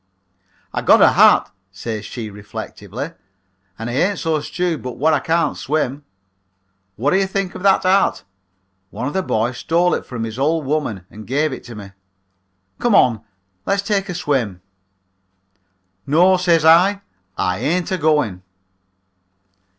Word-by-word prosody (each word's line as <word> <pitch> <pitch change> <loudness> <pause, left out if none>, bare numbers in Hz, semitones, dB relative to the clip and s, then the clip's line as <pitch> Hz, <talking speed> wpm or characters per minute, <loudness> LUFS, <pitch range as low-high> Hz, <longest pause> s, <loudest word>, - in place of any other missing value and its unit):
"'I - - -1
got - - +5
a - - +6
hat,' - - +5 0.2
says 105 +2 -5
she 110 -1 -6
reflectively, 105 - -7 0.7
'and 115 - -5
I 120 - -4
ain't 185 +10 +1
so 160 -2 0
stewed 170 +2 -2
but 125 -1 -7
wot 155 +3 +2
I 150 - +3
can't 165 +2 0
swim. 145 -1 -2 0.9
Wot 135 +7 +1
do 190 - +4
you 195 - +1
think 195 -1 -3
of - - -8
that 195 0 +3
hat? 190 +2 +2 0.7
One 125 - -5
of 145 - -3
the 190 - 0
boys 120 -6 -1
stole 175 +2 +2
it - - -1
from 115 -3 -5
his 115 +2 -5
old 155 +2 +1
woman 130 - -2
and 110 0 -11
gave 145 +3 0
it - - -8
to 120 - -9
me. 100 -2 -10 0.9
Come 240 -4 +2
on, 115 -4 +4 0.5
let's 200 0 +1
take 200 -1 -1
a 180 - -4
swim.' 120 - -1 1.5
"'No,' 180 +6 +4
says 170 -3 +2
I, 185 +5 +5 0.4
'I 90 +1 -1
ain't 170 - -1
agoing.' 150 - +1
150 Hz, 155 wpm, -19 LUFS, 115-180 Hz, 1.5 s, a